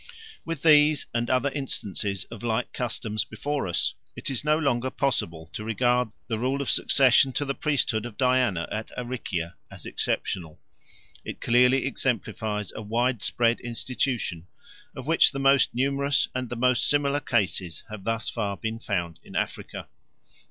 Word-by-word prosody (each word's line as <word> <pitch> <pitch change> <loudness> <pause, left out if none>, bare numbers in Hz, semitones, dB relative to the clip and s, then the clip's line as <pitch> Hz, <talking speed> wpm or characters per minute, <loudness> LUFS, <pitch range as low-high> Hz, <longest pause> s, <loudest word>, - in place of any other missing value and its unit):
_ - - -19 0.4
With 165 -4 -5
these 150 -2 +6
and 120 0 -1
other 130 +2 +2
instances 105 -8 -3
of 115 -3 -8
like 120 +1 -1
customs 110 -3 -1
before 145 -6 -3
us 85 -1 0 0.2
it - - -4
is 135 - -1
no 150 +1 +3
longer 130 -5 +1
possible 85 - -2
to 105 - -5
regard 120 +2 +1 0.2
the 110 -2 -2
rule 130 +3 0
of 140 - 0
succession 135 0 +4
to 145 - 0
the 135 - -1
priesthood 125 -7 0
of 110 - -12
Diana 125 -9 +2
at 110 +1 -4
Aricia 120 -9 -3 0.2
as - - -11
exceptional; 80 -4 -2 0.6
it - - -6
clearly 125 +3 +4
exemplifies 110 -5 -2
a - - -5
widespread 115 +1 +1
institution, 120 -7 -2 0.5
of - - -7
which - - +5
the - - -5
most 135 -2 +4
numerous 140 +2 +2
and 125 -1 -3
the 120 - -4
most 125 0 +2
similar 145 0 +2
cases 95 - -1
have 105 -3 -7
thus 115 +1 -1
far 100 -4 -2
been 110 0 -4
found 85 -7 -3
in - - -13
Africa. - - -3
120 Hz, 160 wpm, -26 LUFS, 110-135 Hz, 0.6 s, these